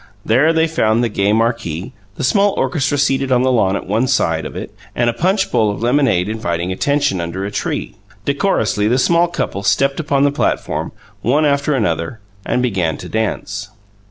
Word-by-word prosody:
There 130 +9 +4
they 160 0 +3
found 115 -8 +1
the 120 - +1
gay 100 -1 +1
marquee; 115 -7 -1 0.2
the - - -5
small 200 +9 +3
orchestra 145 -3 0
seated 135 -1 +1
on 125 0 +3
the 130 - +2
lawn 100 -6 +2
at - - -4
one 110 +7 0
side 80 - +1
of - - -11
it, - - -6 0.2
and 120 0 +2
a - - -10
punch 190 - 0
bowl 110 -2 +2
of 100 +2 -4
lemonade 120 -8 +2
inviting 90 -5 -2
attention, 140 - 0
under 85 +3 -4
a 100 - -4
tree. - - -3 0.3
Decorously 105 0 +1
the 120 +3 +2
small 170 +6 +3
couples 100 - -3
stepped 140 +6 +2
upon 140 -3 +1
the 145 - +3
platform, 145 - -1 0.3
one 145 +6 +2
after 140 0 +1
another, 85 -2 -1 0.2
and 125 - 0
began 90 -10 0
to - - -8
dance. 105 -2 -3
120 Hz, 185 wpm, -18 LUFS, 100-140 Hz, 0.3 s, There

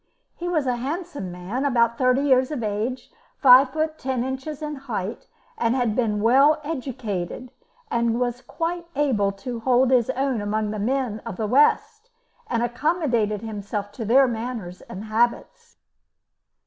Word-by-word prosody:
He 350 +1 -4
was 315 -5 0
a 250 -2 0
handsome 285 - -4
man, 180 +9 -4
about 235 -4 +2
thirty 255 +1 +3
years 260 -2 +3
of 290 -7 -4
age, 220 +5 -3 0.3
five 260 0 +7
feet 315 +1 -2
ten 260 -2 -1
inches 265 +4 -5
in 300 0 -3
height, 235 -7 -5 0.3
had 235 -1 +1
been 215 -4 0
well 275 +6 +5
educated, 250 - -4 0.4
was 235 +1 0
quite 340 +6 -4
able 240 -9 +1
to 235 +4 -6
hold 255 +2 +3
his 245 -2 +3
own 260 -3 0
among 210 +1 -1
the 215 - -4
men 245 0 -1
of 230 -5 -6
the 220 - -1
West, 430 - +2 0.4
and 235 -1 0
accommodated 240 - 0
himself 205 -1 -5
to 215 +3 -6
their 260 +5 +5
manners 225 -6 -5
and 190 +3 -8
habits. 230 +2 -1
245 Hz, 150 wpm, -24 LUFS, 220-275 Hz, 0.4 s, five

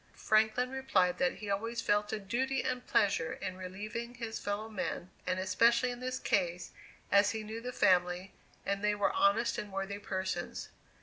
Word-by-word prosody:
Franklin 220 +3 +2
replied 205 -10 +1
that 265 -1 +2
he 210 - -7
always 230 +4 -2
felt 205 0 +1
a - - -1
duty 250 +6 -1
and 250 -1 -2
pleasure 165 -5 +2
in 185 - -5
relieving 210 +6 -6
his 230 -2 -4
fellow 205 +2 -3
men, 185 -4 -4 0.2
and 185 - +1
especially 235 +7 +3
in 245 - -7
this 255 0 -2
case, 180 -2 0 0.4
as 200 0 +6
he 220 +1 -3
knew 220 +2 -6
the 250 +1 -4
family; 180 -3 +2 0.3
and 200 0 -1
they 210 0 +3
were 205 -1 +1
honest 210 +4 +3
and 205 - -6
worthy 195 +1 -3
persons. 190 -2 -3
210 Hz, 175 wpm, -32 LUFS, 190-235 Hz, 0.4 s, as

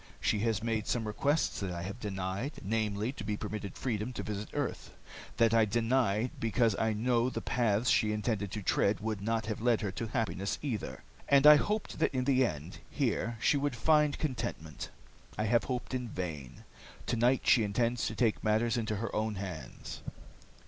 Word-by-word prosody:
She 105 - +1
has 110 -1 0
made 110 -2 -1
some 115 -2 0
requests 140 +8 0
that 100 - -3
I 85 -1 -4
have 100 +6 -6
denied, 100 +5 -3
namely, 105 +2 -1
to 120 - -8
be 105 0 -2
permitted 105 -2 -5
freedom 115 -1 -2
to - - -4
visit 105 0 -4
earth. - - -4 0.4
That 115 -1 +4
I 115 -1 +5
denied 115 0 +1
because 115 -1 +2
I 110 -1 +2
knew 120 +2 +2
the - - -3
paths 115 -1 +1
she 110 -2 +3
intended 105 -1 -1
to 105 +1 -5
tread 100 +2 +2
would 105 -1 -3
not 115 +1 0
have 110 0 -4
led 120 -1 +3
her 105 -3 -2
to 115 +4 -4
happiness 100 -4 -1
either, 120 -8 -4 0.3
and 140 0 +6
I 150 0 +11
hoped 210 +7 -2
that - - +1
in 130 - +1
the 130 0 +3
end, 80 - -3
here 120 -4 -1
she 145 - +3
would 140 -2 -1
find 150 +4 +3
contentment. 115 - -4 0.5
I 110 - 0
have 115 +2 +2
hoped 125 -1 -3
in 125 -2 -2
vain. 80 - -6 0.4
Tonight 120 +2 +2
she 125 - +6
intends 115 +3 0
to 110 - -4
take 110 -1 +1
matters 110 +3 +2
into 110 -2 -1
her 110 +3 -4
own 110 0 0
hands." 95 -5 -7
110 Hz, 185 wpm, -31 LUFS, 105-120 Hz, 0.5 s, I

